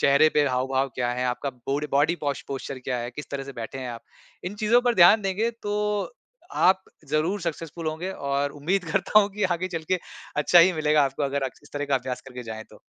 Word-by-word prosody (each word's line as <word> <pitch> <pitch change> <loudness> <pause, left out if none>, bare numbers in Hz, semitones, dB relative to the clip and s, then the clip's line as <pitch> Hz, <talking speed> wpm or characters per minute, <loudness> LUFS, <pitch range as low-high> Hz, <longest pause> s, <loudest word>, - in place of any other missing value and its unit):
चेहरे 140 +3 +5
पे 145 -1 +4
हाव-भाव 130 +1 0
क्या 120 -1 0
हैं, 125 +1 -1
आपका 125 +3 -2
बोड 135 +4 -3
बॉडी 145 +5 +3
पोस 145 -2 -2
पोस्चर 135 0 -5
क्या 125 -1 -3
है, 120 +1 -4
किस 150 - -8
तरह 140 -1 -4
से 140 - -8
बैठे 120 +2 -6
हैं 130 -2 -4
आप, 115 -1 -8 0.4
इन 180 +3 -4
चीज़ों 215 +3 +4
पर 245 -1 +2
ध्यान 200 +3 +7
देंगे 195 +4 0
तो, 210 -2 -1
अ - - -10 0.5
आप 190 +1 +5 0.3
ज़रूर 160 +7 0
सक्सेसफुल 165 -1 -5
होंगे 160 +4 -3
और 140 -1 -1
उम्मीद 175 +6 -1
करता 195 +3 +4
हूँ 200 - +1
कि 210 - -3
आगे 185 +2 -3
चल 165 -3 -4
के, 185 - +3 0.4
अच्छा 150 +4 +5
ही 185 +2 +6
मिलेगा 150 -1 +3
आपको 135 +2 -3
अगर 140 0 -1
अ, 130 - 0
इस - - -19
तरह 145 0 -1
का 140 - +1
अभ्यास 125 0 -4
करके 125 -1 -8
जाएँ 110 -1 -6
तो। - - -16
150 Hz, 230 wpm, -25 LUFS, 135-185 Hz, 0.5 s, ध्यान